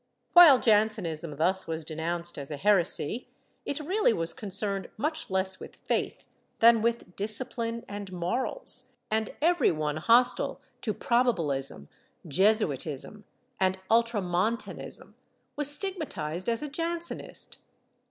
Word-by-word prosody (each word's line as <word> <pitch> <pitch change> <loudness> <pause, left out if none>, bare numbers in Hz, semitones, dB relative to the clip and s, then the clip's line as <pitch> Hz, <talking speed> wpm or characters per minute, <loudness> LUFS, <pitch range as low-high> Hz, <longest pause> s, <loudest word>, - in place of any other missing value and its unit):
While 340 -6 +10
Jansenism 205 -9 +1
thus 185 +5 +1
was 160 -1 -3
denounced 170 +1 -3
as 140 - -7
a 150 - -5
heresy, 200 - +2 0.4
it 285 - -2
really 370 - +2
was 165 -4 0
concerned 200 -3 -2
much 310 +7 -3
less 190 0 +2
with - - -10
faith - - -3 0.3
than 230 -1 +6
with 230 -5 -2
discipline 230 +2 -2
and 205 -1 -7
morals, 245 +7 -1 0.2
and 220 0 0
every 345 +1 +4
one 155 -2 -2
hostile 240 +9 +3 0.2
to 215 -4 -2
Probabilism, 155 - 0 0.4
Jesuitism 190 - 0 0.3
and 190 0 +2
Ultramontanism 225 -1 -1 0.4
was 295 -1 +1
stigmatized 290 - -1
as 230 +4 -1
a - - -3
Jansenist. 335 +3 -5
210 Hz, 115 wpm, -28 LUFS, 170-245 Hz, 0.4 s, While